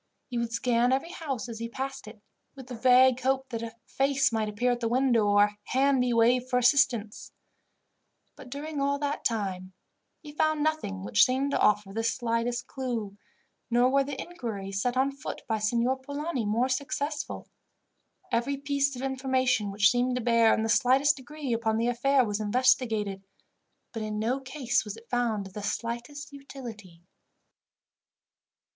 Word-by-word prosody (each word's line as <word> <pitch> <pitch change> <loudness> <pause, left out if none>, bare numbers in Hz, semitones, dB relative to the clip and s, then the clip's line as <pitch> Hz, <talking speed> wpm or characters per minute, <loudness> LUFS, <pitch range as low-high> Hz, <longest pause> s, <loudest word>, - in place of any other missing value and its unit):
He 240 - -1
would 235 -1 -2
scan 240 +1 +1
every 275 +6 0
house 275 - -4
as 230 -2 -7
he 230 0 -4
passed 270 -1 -5
it, 215 0 -11 0.4
with 265 -2 -10
the 255 - -8
vague 255 +1 +5
hope 265 +1 0
that 230 -2 -4
a 230 0 -7
face 275 -1 +1
might 220 -2 -1
appear 240 +4 0
at 240 - -1
the 230 - -1
window, 240 -3 +2
or 205 0 +5
a 205 0 -1
hand 270 0 +2
be 250 -1 +1
waved 245 +2 +3
for 250 - +2
assistance. 245 -4 +2 1.0
But, 255 - -12
during 290 +2 -5
all 280 0 +1
that 290 0 -3
time, 190 -5 -2 0.5
he 300 - -10
had 295 - -14
found 310 -1 +2
nothing 255 -12 -2
which 210 - +4
seemed 265 +2 +1
to - - 0
offer 205 -2 +2
the 225 +2 -2
slightest 235 +1 -1
clue, 235 -7 -4 0.5
nor 245 +2 +3
were 275 0 +3
the 275 -1 -6
inquiries 205 - -5
set 245 +2 -1
on 270 +1 +2
foot 275 - -7
by 220 -1 0
Signor 235 +4 +1
Polani 285 -3 -3
more 230 +5 +1
successful. 285 +3 -3 0.8
Every 265 +4 0
piece 280 -1 0
of 250 - -6
information 260 -5 0
which 200 +1 +4
seemed 250 +1 +1
to 250 - -1
bear, 230 -1 +4
in 220 - +1
the 225 - -1
slightest 270 +5 +4
degree, 275 0 -5
upon 225 -1 0
the 230 - 0
affair 260 +2 +2
was 205 -1 -2
investigated, 220 -3 +1 0.7
but 225 - -4
in 215 0 -3
no 235 +5 0
case 265 -2 -1
was 210 0 -7
it 230 +1 -17
found 235 -5 0
of 190 - -11
the 210 - -6
slightest 240 +7 -5
utility. 225 -11 -10
245 Hz, 175 wpm, -28 LUFS, 225-270 Hz, 1.0 s, vague